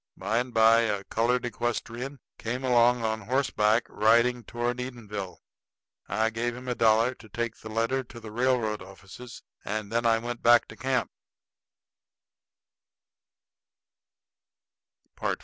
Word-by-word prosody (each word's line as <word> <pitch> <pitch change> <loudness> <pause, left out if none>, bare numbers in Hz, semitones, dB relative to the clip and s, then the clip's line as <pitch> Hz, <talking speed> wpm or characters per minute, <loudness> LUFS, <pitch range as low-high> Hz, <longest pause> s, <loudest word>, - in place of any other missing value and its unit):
By 105 +5 0
and 125 +1 -3
by 115 0 +6
a 105 -4 0
colored 120 +4 0
equestrian 120 +3 -3 0.2
came 125 +3 -3
along 120 -1 +4
on 110 0 -1
horseback, 115 -2 +1
riding 120 +3 +3
toward 120 +3 -3
Edenville. 105 -7 -6 0.7
I 110 +2 0
gave 120 +1 -2
him 125 +1 -10
a 125 - 0
dollar 115 +1 +3
to 110 -3 -16
take 120 +2 -3
the 110 - -10
letter 115 +4 0
to 120 0 -11
the 110 -2 -10
railroad 120 -3 0
offices; 95 +6 -12 0.2
and 105 0 -4
then 115 +1 +1
I 115 -1 +4
went 120 +1 -5
back 120 0 +5
to - - -10
camp. 130 -2 -1
115 Hz, 130 wpm, -27 LUFS, 110-125 Hz, 0.7 s, by